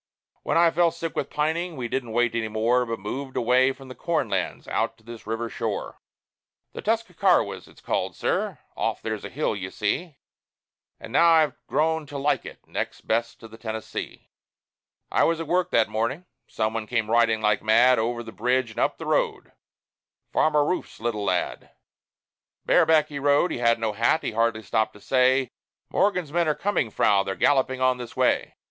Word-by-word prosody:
When - - 0
I 170 0 +5
fell 170 +1 +3
sick 165 0 -6
with 140 - -2
pining, 160 +2 -1
we 120 -2 -3
didn't 120 -1 -3
wait 120 0 +2
any 115 -1 -1
more, 115 +3 +1
But 115 0 -3
moved 130 +7 -5
away 125 +2 +4
from 135 0 -12
the 130 - -8
corn 165 +3 -1
lands, - - -2
out 115 - -1
to 110 - -25
this 115 -1 -11
river 115 +1 -2
shore 115 -2 -4 0.7
The - - -6
Tuscarawas 225 +1 +1
it's - - -19
called, - - -2
sir - - -1 0.2
off - - -2
there's - - -3
a - - -6
hill, - - -1
you - - -5
see 170 -6 -2 0.8
And - - -10
now 170 +1 +6
I've 160 -2 +4
grown 160 0 0
to 145 0 -6
like 140 +2 0
it - - -12
next - - -4
best 115 +1 -1
to 115 - -10
the 110 +1 -14
Tennessee. 110 -1 -6 0.8
I - - +3
was 165 0 +2
at 165 - -3
work 180 +3 +1
that 115 - +3
morning. 115 +10 -2 0.2
Some 110 0 -1
one 110 -1 -4
came 115 -2 0
riding 115 -1 +3
like 105 -1 +1
mad 120 +3 +5
Over 120 +1 -1
the 110 - -9
bridge 125 +3 0
and - - -7
up - - +1
the - - -7
road - - 0 0.8
Farmer 150 -2 +3
Rouf's 180 - -3
little 110 -2 -2
lad. 90 -2 -1 1.0
Bareback 160 -2 +4
he 145 -1 -5
rode; 145 +5 +3
he - - -3
had 115 -1 +3
no 110 -2 -2
hat; 120 +9 +2
he - - -2
hardly 110 0 0
stopped 110 +3 0
to 105 - -15
say, 130 +2 +2 0.4
"Morgan's 180 -6 +1
men 170 -1 +2
are 150 - +2
coming, 195 - 0
Frau; 100 -1 +3
they're 95 0 -3
galloping 130 -2 +2
on 130 -1 +2
this 120 -2 -8
way. - - +1
125 Hz, 190 wpm, -25 LUFS, 115-150 Hz, 1.0 s, now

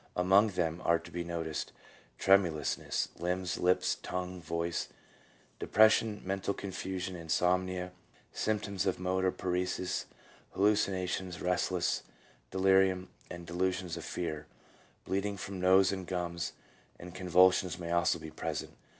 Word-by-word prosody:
Among 95 +4 +5
them 85 -4 -1
are 85 - +4
to 85 +1 -12
be 85 +1 -3
noticed 85 -2 -4 0.4
tremulou.s 90 -6 +3
ness - - -2
(limbs, 90 +1 -1
lips, 90 +1 +3
tongue, 90 0 -4
voice), 85 +1 -2 0.7
depression, 110 -1 +4
mental 95 +1 -1
confusion, 95 -1 -4
insomnia, 90 +2 0 0.4
symptoms 105 -3 -1
of 95 - +1
motor 95 +1 +1
paresis, 90 0 -2 0.5
hallucinations, 95 -3 +1
restless 90 0 0 0.5
delirium, 95 -1 +3 0.2
and 85 0 -8
delusions 90 0 -1
of - - -6
fear; 75 -4 -4 0.6
bleeding 100 +1 -1
from 95 0 -6
nose 95 +1 +5
and 95 -2 -4
gums, 85 -3 -3 0.5
and 90 0 -9
convulsions 90 -1 +4
may 85 -2 -5
also 85 0 +3
be 80 - -9
present. - - -4
90 Hz, 120 wpm, -32 LUFS, 85-95 Hz, 0.7 s, Among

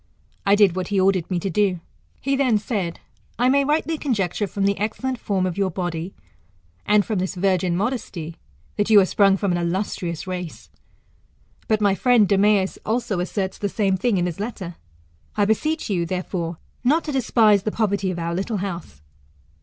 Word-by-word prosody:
I 200 - +6
did 200 -4 +4
what 185 -1 -2
he 200 -2 0
ordered 190 -2 +2
me 185 - 0
to 195 - -2
do. 190 -1 +1 0.4
He 275 +1 0
then 260 -5 +3
said, 200 -5 -3 0.4
I 245 +2 +3
may 280 +1 +4
rightly 310 +2 0
conjecture, 210 - -1
from 195 +1 -2
the 200 0 +1
excellent 245 +4 -2
form 190 -3 0
of 185 +1 -3
your 195 -1 +2
body, 175 0 -4 0.7
and 210 -1 +4
from 215 -5 -1
this 185 +1 -2
virgin 185 -2 +1
modesty, 190 -7 -3 0.4
that 205 +1 +1
you 215 -2 +8
are 195 - +5
sprung 195 0 +3
from 200 -1 0
an 175 - 0
illuslrious 170 -1 -2
race. 180 -3 -6 1.0
But 215 -1 +1
my 200 -2 +4
friend 235 0 +4
Demeas 200 -1 +2
also 220 -4 -1
asserts 190 +1 -3
the 205 - -1
same 195 -2 +1
thing 200 +2 +1
in 175 - +1
his 175 0 -4
letter. 200 -5 -5 0.6
I 205 - +3
beseech 310 +10 0
you, 175 -5 -1
therefore, 175 -2 -3 0.3
not 300 +6 +3
to 305 - -4
despise 225 -6 +3
the 215 - -2
poverty 200 -3 0
of 180 - -3
our 170 0 -2
little 195 +5 -2
house. 170 - -6
200 Hz, 185 wpm, -22 LUFS, 180-220 Hz, 1.0 s, you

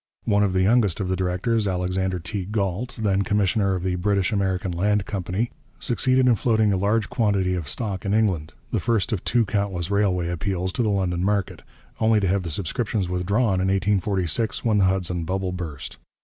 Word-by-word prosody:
One 100 -2 +3
of 100 -2 +2
the 95 0 +2
youngest 105 -3 +3
of 95 -2 -2
the 95 - +1
directors, 95 +5 0
Alexander 90 0 -1
T. 95 +3 -4
Galt, 105 +3 -2
then 100 -3 +1
commissioner 100 -1 +1
of 90 - -4
the 95 -1 0
British 100 +2 +1
American 95 -3 0
Land 100 +3 +1
Company, 100 +3 -2 0.3
succeeded 130 +2 +2
in 125 - +6
floating 110 -2 +2
a - - +2
large 105 +4 +1
quantity 100 -7 +1
of 85 -5 -3
stock 100 -3 -3
in 100 - -2
England 95 -8 +1 0.2
the - - +1
first 115 -6 0
of 105 -5 -2
countless 100 -6 0
railway 95 -4 +1
appeals 95 +1 -2
to - - -1
the 110 - +1
London 90 -3 0
market 100 -1 -1 0.4
only 110 -1 +3
to 100 - 0
have 95 +2 +1
the 85 - -5
subscriptions 100 +4 -2
withdrawn 95 +2 +1
in 95 - +1
1846 95 +1 0
when 110 -3 +3
the 95 - +4
Hudson 90 -2 0
bubble 95 +2 -2
burst. 80 -8 -6
95 Hz, 190 wpm, -24 LUFS, 90-105 Hz, 0.4 s, in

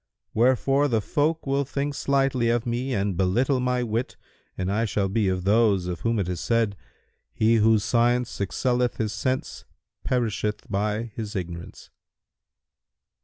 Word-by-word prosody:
Wherefore 130 +4 +3
the 115 -5 +1
folk 155 +9 0
will 140 +1 +1
think 140 +1 -3
slightly 135 -4 +1
of 120 0 +1
me 120 +3 -2
and 100 -2 0
belittle 120 +9 +1
my 125 0 0
wit 115 +2 -3 0.4
and 95 +1 -1
I 110 +3 +1
shall 100 -3 0
be 105 +1 0
of 90 -1 -1
those 100 -2 +3
of 90 -2 -4
whom 115 +5 0
it 100 -4 -1
is 90 -2 -3
said, 115 -2 +1 0.6
'He 115 +1 +3
whose 110 -1 +4
science 120 +2 +1
excelleth 125 +5 0
his 110 -2 -1
sense 130 +4 -2 0.4
perisheth 110 -4 -1
by 105 +3 -1
his 110 -1 -6
ignorance.'" 85 -2 -7
115 Hz, 150 wpm, -25 LUFS, 100-125 Hz, 0.6 s, whose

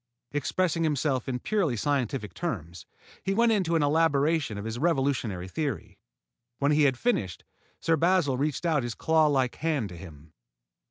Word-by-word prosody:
Expressing 165 +4 0
himself 145 -4 0
in 125 - -1
purely 165 - 0
scientific 130 -5 -1
terms, 90 - -5 0.3
he 195 0 -1
went 230 +1 +4
into 185 -6 +1
an 160 - +3
elaboration 150 -4 +2
of 100 - -6
his 115 +1 -4
revolutionary 135 - 0
theory. 145 +8 -4 0.6
When 140 +1 +2
he 150 0 +4
had 130 -3 +2
finished, 110 - -1 0.4
Sir 165 - +2
Basil 170 -4 +2
reached 145 +5 -2
out 160 -4 +2
his 120 -1 -4
clawlike 150 -6 +2
hand 150 -10 -1
to 90 - -10
him. 80 -3 -13
145 Hz, 155 wpm, -27 LUFS, 120-165 Hz, 0.6 s, went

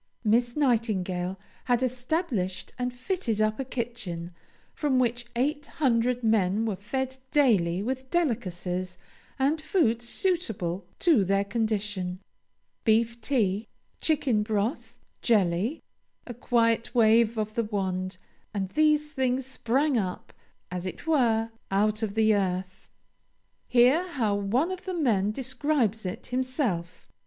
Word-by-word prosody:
Miss 235 +2 +2
Nightingale 195 -9 0 0.3
had 245 0 +2
established 250 - -2
and 250 0 -1
fitted 245 - -2
up 215 +2 +1
a - - 0
kitchen, 230 -9 -5 0.4
from 285 -4 +1
which 240 -1 0
eight 290 +4 0
hundred 245 -3 +2
men 215 -1 +2
were 215 -3 -1
fed 260 +7 -3
daily 200 -11 +3
with 260 +2 -3
delicacies 185 - -1 0.4
and 285 +4 +1
food 295 - +2
suitable 225 - -1
to 315 - +4
their 195 +1 +2
condition. 205 -4 -2 0.6
Beef 230 +1 +2
tea, 220 -5 0 0.3
chicken 280 -8 +2
broth, 215 +5 -2 0.3
jelly 210 - +1 0.4
a 245 - -6
quiet 230 0 +1
wave 230 0 +4
of 215 0 -2
the 230 -1 0
wand, 185 -3 -2 0.4
and 195 -2 -1
these 300 +2 +2
things 260 -2 0
sprang 265 +1 +1
up, 185 -3 -5 0.4
as 180 0 -3
it 185 - -7
were, 230 -8 +2 0.2
out 210 +3 +1
of 215 -2 -2
the 220 -1 +4
earth. 185 -2 -2 0.8
Hear 255 +9 +4
how 240 - 0
one 220 - +1
of 370 -1 -6
the 370 -1 -3
men 215 - +2
describes 255 -4 -1
it 210 +7 -6
himself. 250 - -2
230 Hz, 125 wpm, -27 LUFS, 200-260 Hz, 0.8 s, to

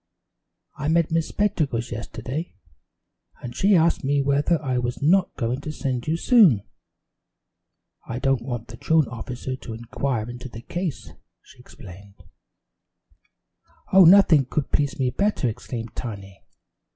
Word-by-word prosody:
I 150 - -2
met 165 0 +2
Miss 165 -1 +1
Spectacles 150 - -1
yesterday, 125 +7 -6 0.9
and 120 -1 -7
she 200 +6 +3
asked 165 0 +2
me 140 +1 +1
whether 145 +4 +1
I 130 -4 -1
was 120 0 -3
not 180 +6 +2
going 120 +3 -2
to 155 - -5
send 130 -4 -3
you 160 +2 0
soon. 170 - +5 1.4
'I - - -4
don't 135 -1 +1
want 120 -2 -6
the 115 - -10
truant 160 -1 +2
officer 125 +2 -6
to 115 - -8
inquire 120 0 -3
into 125 +1 -8
the 115 -1 -10
case,' 175 -1 -5 0.3
she 130 - -19
explained." 100 -6 -14 1.8
"Oh, 190 -1 +8
nothing 170 -6 +6
could 140 +1 -3
please 145 +3 0
me 130 -3 0
better!" 200 -4 0
exclaimed 115 0 -6
Tiny. 100 -5 -7
135 Hz, 140 wpm, -23 LUFS, 120-160 Hz, 1.8 s, Oh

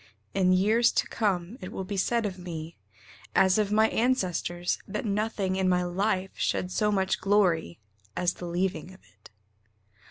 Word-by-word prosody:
In 185 -1 +3
years 215 +6 +4
to - - +1
come 200 0 -1
it 185 - -7
will 190 - -4
be 200 +2 -5
said 230 +4 +1
of 190 -2 -4
me, 165 -2 -7 0.6
As 190 +2 +4
of 210 -1 0
my 220 +1 +4
ancestors, 180 -7 0
that 210 +3 -4
nothing 205 -2 -1
in 190 -1 +2
my 180 0 +2
life 190 +1 -1
Shed 180 - -1
so 210 +2 +1
much 190 -2 0
glory 185 - +2 0.4
as 180 -1 +1
the 175 - -8
leaving 180 0 -2
of - - -20
it. 105 - -20
190 Hz, 165 wpm, -27 LUFS, 180-210 Hz, 0.6 s, years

